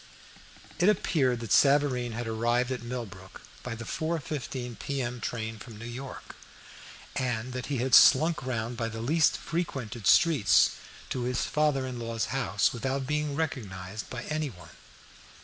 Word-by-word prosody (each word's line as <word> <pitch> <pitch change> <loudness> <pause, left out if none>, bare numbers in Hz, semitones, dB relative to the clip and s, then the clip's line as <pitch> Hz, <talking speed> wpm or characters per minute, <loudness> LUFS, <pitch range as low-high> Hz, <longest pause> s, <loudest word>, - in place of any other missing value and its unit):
It 180 +3 +5
appeared 135 - +1
that 115 -3 -6
Savareen 135 -4 +4
had 120 +1 -4
arrived 120 +3 +1
at 125 -2 -3
Millbrook 115 -6 -7 0.2
by 125 -2 -5
the 120 +1 -7
4:15 135 -6 -3
p.m. 125 -4 -3
train 110 -2 -4
from 110 0 -10
New 115 - -8
York, 125 +3 -8 0.8
and 125 -2 -2
that 125 0 -4
he 145 - -1
had 130 +2 -1
slunk 160 +5 +7
round 120 -2 -3
by 115 0 -1
the 115 0 -6
least 155 +8 +3
frequented 135 - -3
streets 150 -11 +5 0.4
to 125 -1 -2
his 125 0 0
father 150 -3 +1
in 125 -2 -5
law's 115 -1 -2
house 115 -7 +1
without 135 +3 -2
being 150 0 -1
recognised 105 -10 -4
by 120 -2 -5
any 155 -1 -2
one. 85 -7 -13
125 Hz, 150 wpm, -28 LUFS, 115-140 Hz, 0.8 s, slunk